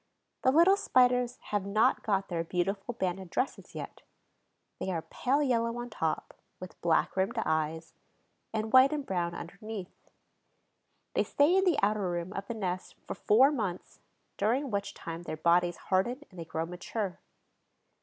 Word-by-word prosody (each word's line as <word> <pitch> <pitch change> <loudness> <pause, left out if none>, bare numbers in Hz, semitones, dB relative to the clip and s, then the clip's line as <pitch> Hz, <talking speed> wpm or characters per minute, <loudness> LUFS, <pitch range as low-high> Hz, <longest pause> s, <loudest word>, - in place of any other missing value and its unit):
The - - +4
little 340 +7 +6
Spiders 250 -5 +3
have 205 -2 +1
not 205 +3 +2
got 195 -2 0
their 170 -2 -2
beautiful 195 +6 -2
banded 185 -3 -2
dresses 255 - -3
yet; - - -7 0.8
they - - -3
are 165 -3 -2
pale 280 +4 0
yellow 230 -3 +1
on 240 0 -6
top, 160 -6 -2 0.3
with 185 -1 -10
black 170 -2 +2
rimmed 195 +5 0
eyes, 160 +1 -1 0.6
and 220 0 -3
white 260 +1 +8
and 295 -2 -2
brown 175 -2 -1
underneath. 195 +2 -8 1.0
They - - +2
stay 295 +6 +3
in 385 0 +4
the 350 -5 +3
outer 205 -2 +2
room 175 +2 -3
of 195 0 -5
the 235 - -4
nest 185 -4 -3
for - - -4
four 260 +7 +5
months, 205 -10 -4 0.4
during 245 +6 +1
which 200 -1 -2
time 165 0 -6
their 165 -2 -5
bodies 175 +2 +3
harden 240 +9 0
and 185 - -12
they 165 - -5
grow 160 0 -3
mature. 180 +3 -4
200 Hz, 160 wpm, -30 LUFS, 175-245 Hz, 1.0 s, white